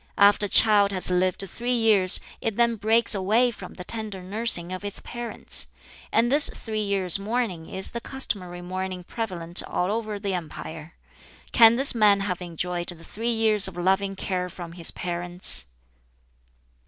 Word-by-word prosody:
After 205 +1 +4
a - - -10
child 205 -2 +5
has 185 -1 +7
lived 185 +1 0
three 245 +5 -2
years 215 -5 +5 0.2
it 225 -2 -2
then 235 -1 +2
breaks 225 +3 +3
away 215 +6 +2
from 195 -5 -11
the 180 - -8
tender 210 -2 -5
nursing 185 -3 -1
of 185 - -7
its 205 0 -3
parents. 240 -1 -3 0.4
And 235 +2 +2
this 290 +1 +3
three 215 -2 -5
years' 195 -3 +2
mourning 205 -6 -3
is 190 0 +1
the 235 - -6
customary 185 -10 -3
mourning 185 0 -5
prevalent 175 -5 0
all 180 +2 -2
over 215 -1 -3
the 200 -1 -4
empire. 160 -2 -8 0.6
Can 230 -2 +6
this 270 +3 +1
man 210 -3 +3
have 185 -3 -3
enjoyed 175 0 -4
the 170 -2 -9
three 225 +7 -4
years 220 -3 +4
of 185 -2 -9
loving 190 +2 0
care 180 -1 -3
from 175 -2 -9
his 170 -1 -2
parents?" 175 - -1
195 Hz, 165 wpm, -24 LUFS, 180-225 Hz, 0.6 s, has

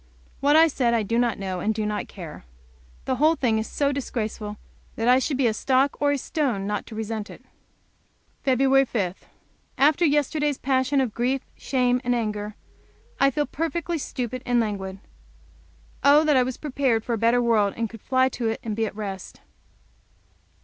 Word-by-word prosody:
What 290 +2 +3
I 320 +1 +8
said 245 -6 +1
I 225 - +1
do 230 +3 0
not 240 -2 +1
know, 190 -2 -4
and 215 +4 0
do 215 -1 -1
not 210 0 -2
care. 170 -6 -10 0.6
The 260 - -1
whole 310 +4 +4
thing 230 -7 +1
is 220 - -3
so 285 -1 0
disgraceful 220 -6 -4 0.4
that 225 - -1
I 250 +1 +6
should 270 +1 -1
be 265 - +2
a 225 - +3
stock 265 +5 +1
or 290 0 +3
a 285 - +1
stone 260 - -1
not 210 0 -3
to 220 - -9
resent 220 0 -4
it. - - -13 1.0
Feb. 270 0 +3
5. 190 -6 -3 0.5
After 300 +5 +4
yesterday's 295 -1 +1
passion 265 +1 +1
of 245 -5 -2
grief, 250 +3 0
shame, 250 -2 +1
and 245 0 +1
anger, 210 -2 -3 0.6
I 275 - +5
feel 295 +2 -1
perfectly 335 +2 -3
stupid 255 -2 -4
and 245 -1 +2
languid. 195 -4 -3 1.1
Oh, 290 +2 +6
that 305 -2 +3
I 260 - +5
was 250 0 -2
prepared 265 -6 0
for 235 - -2
a - - 0
better 230 +2 +3
world, 220 -4 +2
and 230 0 -1
could 225 0 -12
fly 260 0 +2
to 240 -2 -3
it 225 - -3
and 220 -3 -3
be 225 0 0
at - - -8
rest! 195 -3 -7
245 Hz, 185 wpm, -24 LUFS, 220-275 Hz, 1.1 s, I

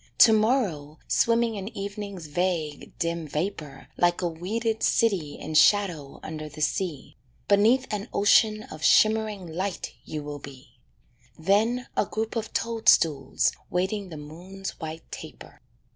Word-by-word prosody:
To 225 - +8
morrow 210 - +1
swimming 230 0 +2
in 195 0 -5
evening's 200 -3 -6
vague, 160 -2 -2
dim 170 -1 -2
vapour 150 -1 -4
Like 175 +1 +2
a - - +2
weeded 220 +7 -2
city 185 -10 +1
in 155 - -6
shadow 165 -5 +3
under 155 -1 -6
the 150 - -12
sea, 165 -1 -2 0.3
Beneath 225 +6 +4
an 210 +2 -4
ocean 215 +1 +4
of 155 -5 -10
shimmering 215 -3 +3
light 180 +3 -4
you 150 -1 -6
will 145 0 -6
be: 130 -3 -13 0.6
Then 220 +9 +2
a 205 - +1
group 220 +1 -3
of 225 -1 -3
toadstools 170 - +2 0.2
waiting 190 +2 -1
the 160 - -8
moon's 180 +6 -8
white 160 -1 -6
taper. - - -10
185 Hz, 135 wpm, -26 LUFS, 155-215 Hz, 0.6 s, To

